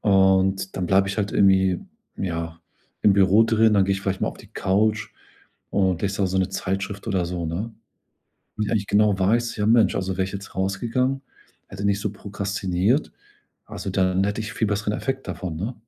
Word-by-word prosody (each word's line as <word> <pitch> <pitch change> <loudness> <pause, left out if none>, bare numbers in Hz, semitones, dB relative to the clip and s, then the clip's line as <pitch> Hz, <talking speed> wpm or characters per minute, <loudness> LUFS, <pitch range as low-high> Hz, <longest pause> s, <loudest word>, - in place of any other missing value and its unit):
und 95 -1 +3
dann 90 -2 -1
bleibe 95 +1 +3
ich 100 - -3
halt 100 -1 -1
irgendwie, 95 -2 +4 0.4
ja, 85 -2 -4 0.4
im 105 - +6
Büro 100 +3 +5
drin. 110 -1 +3
Dann 100 -2 +4
gehe 100 - +1
ich 95 - -2
vielleicht 95 0 -2
mal - - +1
auf - - -6
die - - -14
Couch 105 +3 +1 0.6
und 95 -3 +1
lese 100 0 -1
da - - +3
so 95 +1 -2
'ne 95 - +1
Zeitschrift 100 +2 -4
oder 95 -5 0
so, 85 -1 -3
ne? 100 +8 -4 0.8
Und 105 -1 -1
wenn - - +1
ich 100 -1 -2
genau 105 -1 +3
weiß: 115 +5 +1
„Ja, 105 -1 0
Mensch, 115 0 +4
also 95 -1 -2
wäre 95 - 0
ich 95 - -6
jetzt 100 0 -8
rausgegangen, 120 +8 -1 0.5
hätte 95 +1 -7
nicht 100 0 +1
so 105 - -2
prokrastiniert, 100 - -1 0.5
also, 95 - -6
dann 95 0 +1
hätte 100 +2 -2
ich 110 0 -5
viel 110 - 0
besseren 105 +1 -1
Effekt 135 +2 -3
davon”, 90 -4 -4
ne? 105 +10 -4
100 Hz, 195 wpm, -23 LUFS, 95-105 Hz, 0.8 s, im